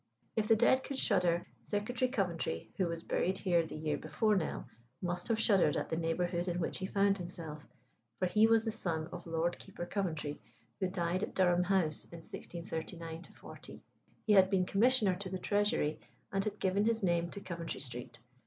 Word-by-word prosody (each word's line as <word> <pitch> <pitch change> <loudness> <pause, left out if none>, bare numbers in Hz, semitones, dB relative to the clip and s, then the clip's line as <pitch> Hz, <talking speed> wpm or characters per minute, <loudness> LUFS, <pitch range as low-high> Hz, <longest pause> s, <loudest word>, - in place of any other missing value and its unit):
If 215 -1 +1
the 225 - +6
dead 250 +4 +4
could 275 - -4
shudder, 180 -8 +2 0.2
Secretary 235 +5 -1
Coventry, 175 - -2
who 185 - +2
was 170 0 -4
buried 190 +2 0
here 175 -4 +2
the 160 - -7
year 150 -1 -1
before 205 +8 +1
Nell, 175 -5 -2 0.3
must 175 0 -2
have 225 -2 +1
shuddered 195 -9 +4
at - - -2
the - - 0
neighbourhood 170 +2 0
in 175 0 -1
which 165 - -2
he 190 - -2
found 200 0 +2
himself; 165 -4 -5 0.6
for 185 - +1
he 215 +4 +5
was 225 0 +4
the 225 - 0
son 170 -7 -2
of - - -7
Lord 165 +1 0
Keeper 190 -3 -7
Coventry, 160 -7 -2 0.4
who 190 - +1
died 180 -1 -1
at - - -3
Durham 180 -1 +4
House 180 -5 +1
in 170 - -10
1639 165 0 -6
40. - - -11 0.4
He 215 - +4
had 190 -2 +7
been 190 -2 +2
Commissioner 215 -1 +3
to 190 0 -5
the 185 - -2
Treasury, 205 -6 +1 0.3
and 195 0 +2
had 210 -1 -2
given 195 +2 +1
his 225 -1 +2
name 170 -2 +2
to 200 - -5
Coventry 170 -4 -5
Street. 125 -3 -5
180 Hz, 190 wpm, -33 LUFS, 170-205 Hz, 0.6 s, had